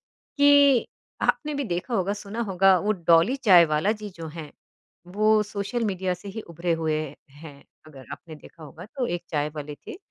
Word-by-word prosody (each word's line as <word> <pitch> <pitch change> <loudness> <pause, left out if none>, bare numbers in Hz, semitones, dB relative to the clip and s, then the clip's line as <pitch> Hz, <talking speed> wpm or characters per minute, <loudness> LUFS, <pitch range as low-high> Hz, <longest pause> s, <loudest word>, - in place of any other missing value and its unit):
कि 285 -3 +4 0.4
आपने 300 -1 0
भी 280 0 -2
देखा 180 +4 -3
होगा, 195 -1 0
सुना 210 +2 -6
होगा 190 0 +4
वो 210 +4 +1
डॉली 170 +6 +3
चाय 190 -10 +6
वाला 170 +8 +2
जी 210 - -6
जो 165 -1 -7
है 155 -3 -8 0.6
वो 215 +1 +3
सोशल 210 +3 -4
मीडिया 185 -3 -1
से 180 +3 -11
ही 210 +3 -6
उभरे 170 0 -3
हुए 155 -1 0 0.4
हैं। 145 0 -13 0.2
अगर 135 -4 -13
आपने 160 - -10
देखा 155 +1 -16
होगा 160 +4 -11
तो 255 +2 -4
एक 175 -5 -3
चाय 150 -1 -1
वाले 150 -1 -6
थे - - -7
185 Hz, 185 wpm, -25 LUFS, 165-215 Hz, 0.6 s, चाय